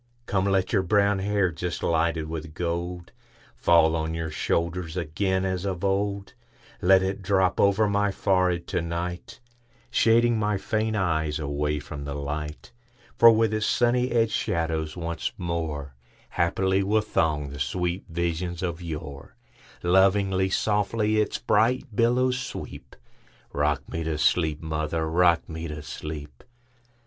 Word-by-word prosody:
Come, 95 -4 0
let 95 0 +1
your 100 - +4
brown 100 +1 +2
hair, 100 -2 +1
just 85 +2 -4
lighted 80 -1 +1
with 80 -1 -6
gold, 85 +1 -3 0.4
Fall 85 -1 +4
on 80 0 -2
your 80 -1 -3
shoulders 85 +2 -2
again 95 +3 -1
as 95 -1 -2
of 95 -2 -3
old; 100 +1 -1 0.5
Let 95 +1 +5
it 95 +1 -2
drop 95 -1 +1
over 100 +2 +4
my 100 0 +1
forehead 90 -3 +1
to 90 - 0
night, 90 +6 -5 0.5
Shading 115 0 +3
my 105 -1 +1
faint 110 +2 -1
eyes 80 -6 0
away 75 0 -1
from 70 0 -8
the 70 0 -4
light; 75 +1 -5 0.5
For 115 - +10
with 110 -1 +3
its 110 -1 0
sunny 125 +1 +2
edged 115 -2 +2
shadows 80 -1 -1
once 85 -1 -3
moreHaply 85 +3 -2
will 105 +3 +2
throng 75 -8 0
the 70 +1 -8
sweet 90 +7 -2
visions 85 +1 -2
of 85 -1 -3
yore; 75 -4 -7 0.5
Lovingly, 95 +1 +3
softly, 105 +2 +1
its 105 - 0
bright 115 +2 +1
billows 125 +2 +2
sweep;—Rock 70 - -5
me 80 - -4
to 80 -1 -1
sleep, 80 -1 +1
mother,—rock 80 +2 +1
me 80 +1 -6
to 75 -1 -7
sleep! 75 -1 -8
90 Hz, 135 wpm, -26 LUFS, 80-100 Hz, 0.5 s, For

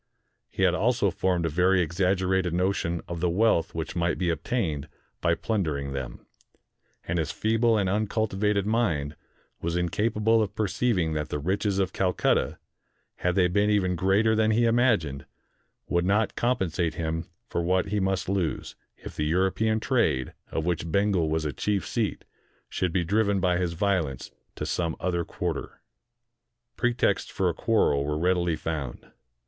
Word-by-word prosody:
He - - -2
had 90 -2 +4
also 105 0 +2
formed 90 -2 0
a - - +1
very 90 +4 +3
exaggerated 90 +1 +1
notion 90 -2 0
of 85 -1 -5
the 90 +1 +1
wealth 90 -3 +2
which 80 0 -4
might 85 -1 0
be 90 -2 +1
obtained 80 - -2 0.3
by 85 0 +2
plundering 80 -11 -2
them; 65 -3 -6 0.8
and 85 0 -1
his 80 - -1
feeble 115 +1 +2
and 100 -2 +1
uncultivated 105 0 0
mind 85 -11 0 0.5
was 85 +1 -1
inca 90 +6 +1
pable 110 +1 +2
of 105 - -2
perceiving 100 -5 0
that 75 -1 -2
the - - -2
riches 95 +6 -1
of 95 -2 0
Calcutta, 90 -2 +1 0.6
had 90 0 0
they 90 -2 +4
been 100 +4 +2
even 95 -3 +2
greater 100 +5 +3
than 110 0 +3
he 115 +2 +3
imagined, 110 - +1 0.6
would 85 0 +1
not 105 +4 +1
compen 120 -8 0
sate 85 -1 -1
him 80 0 -2 0.2
for 85 - -2
what 90 +3 +1
he 105 +1 0
must 95 -1 0
lose, 95 -4 -2 0.2
if - - -10
the 75 - -1
European 95 +6 +1
trade, 110 - +1 0.2
of 80 - -2
which 85 -2 -1
Bengal 100 -5 +2
was 80 0 -1
a 75 - -2
chief 100 +7 -1
seat, 110 -4 -2 0.4
should 90 -2 -1
be 90 0 +1
driven 100 +2 +1
by 90 -1 +2
his 90 -2 -1
violence 85 -8 -1 0.2
to - - -4
some 85 -2 -1
other 85 -1 -1
quarter. - - -4 1.0
Pretexts 120 0 +1
for 95 -2 0
a - - -1
quarrel 80 -8 +2
were 75 +1 -2
readily 90 0 +1
found. 75 -6 -5
90 Hz, 165 wpm, -26 LUFS, 85-105 Hz, 1.0 s, had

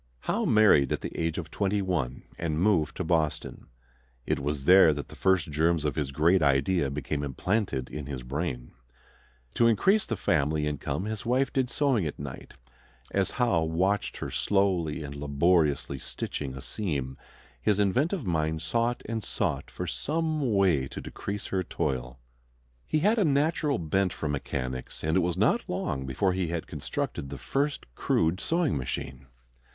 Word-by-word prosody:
Howe 230 +2 0
married 110 - +5
at - - -1
the - - -6
age 80 -1 -1
of 85 -3 -5
twenty 100 0 0
one 85 -10 -2 0.2
and 80 -2 -1
moved 90 -5 +2
to - - -1
Boston. 80 -2 -1 0.6
It - - 0
was 70 -1 -2
there 90 -4 +7
that 70 - -6
the - - -11
first 95 -5 +2
germs 80 +1 +2
of 75 - +1
his 75 -4 -2
great 85 +6 +3
idea 70 +2 +2
became 70 +1 -3
implanted 75 - -1
in 75 -2 -6
his 65 -3 -5
brain. 65 -2 -4 0.8
To 115 - +4
increase 190 - +3
the 110 - -2
family 75 -5 +1
income 75 +5 -2
his 110 -1 -4
wife 130 +3 +1
did 130 -2 +1
sewing 125 - +1
at 75 - -6
night. 70 -2 -8 0.6
As 100 -1 +1
Howe 120 -10 +1
watched 90 +5 0
her - - -5
slowly 90 -6 +1
and 70 -1 -6
laboriously 75 -1 +1
stitching 65 0 -5
a 65 - -8
seam, 70 -10 -3 0.5
his 105 -2 +2
inventive 130 - +1
mind 80 -2 0
sought 115 +7 0
and 110 -1 -3
sought - - -2
for - - -5
some 155 -4 -1
way 85 -9 +3
to - - -7
decrease 100 0 -5
her 95 - 0
toil. 65 -7 -3 0.7
He 155 - +1
had 215 +6 +3
a - - +4
natural 150 -1 +2
bent 90 +3 0
for 80 - -4
mechanics, 65 -3 -4
and 80 +1 +1
it - - +5
was 90 -1 0
not - - +3
long 65 0 -2
before 90 +9 +1
he 90 -2 -1
had 85 0 -3
constructed 70 - -4
the - - -6
first 140 +1 -1
crude 80 +7 +1
sewing 165 -4 +1
machine. 65 0 -5
85 Hz, 165 wpm, -28 LUFS, 70-105 Hz, 0.8 s, there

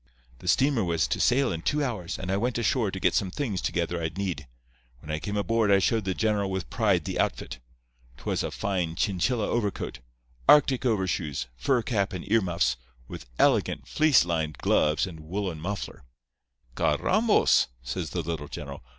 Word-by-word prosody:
"The - - -11
steamer 135 -5 +3
was 85 -3 +1
to - - -1
sail 130 +1 +3
in 80 - -4
two 150 - 0
hours, 110 -10 -3
and 95 0 -4
I 95 - +1
went 120 +4 -1
ashore 120 -2 +1
to 95 - -5
get - - +2
some 95 - +1
things 105 -3 -3
together 85 0 -1
I'd 80 +2 -4
need. 90 -8 -3 0.5
When 75 +5 -9
I 75 - -1
came 105 +5 -3
aboard 110 +2 +1
I 100 - +6
showed 110 +2 +1
the 95 -1 -1
general 105 -3 0
with 95 -10 -4
pride - - +2
the - - -3
outfit. - - -2 0.6
'Twas - - -2
a - - -2
fine 90 -5 -2
Chinchilla 105 +5 0
overcoat, 105 -4 -2 0.5
Arctic 135 -3 +5
overshoes, 90 - -1
fur 120 - +1
cap 105 -4 -1
and 90 0 -6
earmuffs, 85 - +2 0.3
with - - -9
elegant - - +2
fleece 155 - +4
lined 80 -3 -2
gloves 75 +1 +2
and 85 -4 -9
woolen 90 +1 -4
muffler. 100 +3 -5 0.7
"'Carrambos!' 200 - +3 0.2
says 60 +7 -4
the 85 - -3
little 80 -2 -4
general. - - -7
95 Hz, 175 wpm, -27 LUFS, 85-115 Hz, 0.7 s, I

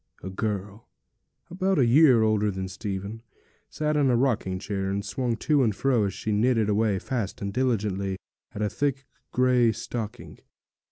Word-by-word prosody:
A 95 - -5
girl, 105 +1 -4 0.6
about 190 +1 0
a 130 - +4
year 125 -2 +6
older 105 -1 +2
than 95 -1 -4
Stephen, 100 +2 -5 0.5
sat 150 0 -1
in 145 -3 +3
a 125 - +3
rocking 115 -7 0
chair, 95 0 -3
and 100 +1 -2
swung 120 +4 -1
to 150 +2 +2
and 110 -6 +1
fro 125 -2 +2
as 100 - -2
she 110 - -3
knitted 110 0 +2
away 105 -1 +2
fast 115 -2 -3
and 100 -1 -4
diligently 100 -6 0 0.3
at 105 - -4
a 105 - +1
thick 135 -2 -1 0.3
grey 125 -2 +3
stocking. 110 0 -6
110 Hz, 165 wpm, -26 LUFS, 100-125 Hz, 0.6 s, year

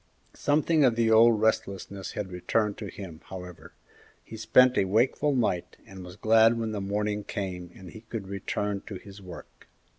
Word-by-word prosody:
Something 150 +1 +2
of 125 -4 +4
the 115 -1 +2
old 115 0 +6
restlessness 100 -3 -2
had 100 -3 -5
returned 105 +4 -1
to - - -5
him, 85 -5 -9
however. 90 -2 -10 0.5
He - - -10
spent 125 +3 +4
a 95 - +2
wakeful 125 +8 +1
night, 95 -8 -1
and 95 -1 -11
was 90 0 -10
glad 115 +2 +4
when 110 -1 -2
morning 105 +1 -2
came 90 -3 -5
and 95 -2 -12
he 110 - -11
could 110 -3 -7
return 100 +1 -3
to 105 - -6
his 100 +1 -11
work. 90 -3 -12
105 Hz, 170 wpm, -27 LUFS, 95-115 Hz, 0.5 s, old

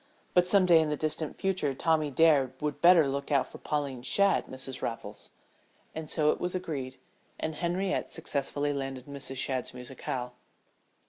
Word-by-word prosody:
But 180 0 +4
some 190 0 +5
day 170 -2 +6
in 160 -1 +1
the 150 - -1
distant 155 0 -1
future 185 -8 -1
Tommy 155 0 +1
Dare 140 -3 +4
would 150 -1 -3
better 170 -4 +7
look 140 +2 -3
out 140 -2 +3
for - - -12
Pauline 140 -4 -2
Shadd, 195 +10 +2
Mrs. 130 0 -5
Van - - 0
Raffles." 105 -2 -9 0.6
And 160 -1 -6
so 150 -2 +3
it - - -3
was 180 +1 -2
agreed, 140 -8 -4 0.4
and 160 - -2
Henriette 180 +4 -1
successfully 145 -2 -1
landed 135 -2 -5
Mrs. 140 -2 -6
Shadd's 130 -1 -2
musicale. 125 0 -5
145 Hz, 170 wpm, -29 LUFS, 135-165 Hz, 0.6 s, better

